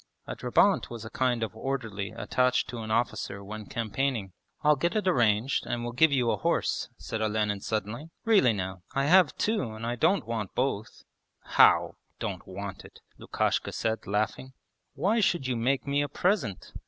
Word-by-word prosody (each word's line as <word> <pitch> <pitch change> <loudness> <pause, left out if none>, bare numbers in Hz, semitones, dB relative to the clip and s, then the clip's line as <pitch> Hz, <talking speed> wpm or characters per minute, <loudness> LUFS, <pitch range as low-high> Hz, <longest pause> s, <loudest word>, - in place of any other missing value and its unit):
(A - - -5
drabant - - +2
was 115 -2 -7
a 110 - -8
kind 125 -3 0
of 110 - -4
orderly 115 -6 -3
attached 125 0 +1
to 120 - -5
an 110 -1 -6
officer 110 -3 -1
when 105 +1 -8
campaigning.) 115 -3 -2 0.3
'I'll 150 0 +5
get 170 +7 0
it 210 -3 0
arranged 120 - +2
and 120 0 -2
will 120 - -3
give 155 +6 +4
you 125 -4 +2
a - - 0
horse,' - - 0
said 110 - -5
Olenin 105 -1 0
suddenly. 110 - -3 0.2
'Really 205 - +5
now, 95 -3 -4
I 135 0 +2
have 180 -1 +5
two 215 -1 +1
and 110 +1 -6
I 120 +1 -1
don't 185 - +2
want 110 -4 -4
both.' 125 -5 -2 0.4
'How - - +4 0.2
don't - - -5
want 95 0 -7
it?' - - -15 0.2
Lukashka - - -1
said, 110 0 -2
laughing. 110 +6 -2 0.4
'Why 215 +5 +2
should 175 -8 +1
you 125 -1 0
make 125 +4 0
me 140 0 +1
a 145 - -2
present? 150 - -1
120 Hz, 180 wpm, -28 LUFS, 110-140 Hz, 0.4 s, I'll